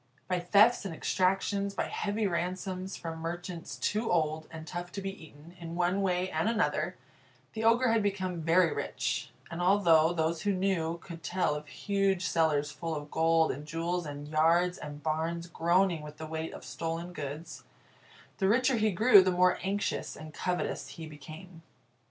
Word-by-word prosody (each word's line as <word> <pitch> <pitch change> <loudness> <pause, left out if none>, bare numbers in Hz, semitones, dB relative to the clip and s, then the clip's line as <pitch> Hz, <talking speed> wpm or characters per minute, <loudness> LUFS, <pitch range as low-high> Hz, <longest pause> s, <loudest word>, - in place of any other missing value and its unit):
By 180 -1 0
thefts 205 +7 +5
and 190 -5 -5
exactions, 195 +3 0
by - - 0
heavy 210 +1 -2
ransoms 185 +1 -2
from 165 -1 -6
merchants 170 +1 -5
too 220 +2 -1
old 155 -2 0
and 160 -1 -8
tough 175 +1 -6
to - - -4
be 195 0 -3
eaten, 155 +3 -16
in 170 -1 -6
one 180 +3 +1
way 185 -1 0
and 160 +7 +1
another, 180 -5 0 0.6
the 220 - -3
Ogre 235 +2 +4
had 225 -1 +3
become 190 -4 -2
very 165 +1 +4
rich; - - -2 0.2
and 170 +1 -4
although 175 -4 +5
those 165 -1 0
who 205 0 +1
knew 185 -3 0
could 170 -1 -10
tell 180 -2 0
of 150 0 -6
huge 195 +2 0
cellars 150 -3 +1
full 165 -1 -4
of 145 0 -7
gold 165 0 +3
and 145 +3 -7
jewels, 170 +1 -2
and 145 0 -7
yards 165 +4 +3
and 150 0 -8
barns 160 +2 -1
groaning 175 0 +2
with 150 0 -10
the 160 - -6
weight 160 +1 -4
of - - -10
stolen 165 +6 -4
goods, 150 +1 -6 0.8
the 190 -2 +3
richer 255 +3 +3
he 215 0 +3
grew 205 +2 +7
the 185 - +2
more 180 0 +3
anxious 200 +2 -2
and 155 0 -10
covetous 180 -5 -2
he 145 +5 -8
became. 160 +3 -11
175 Hz, 175 wpm, -30 LUFS, 160-190 Hz, 0.8 s, grew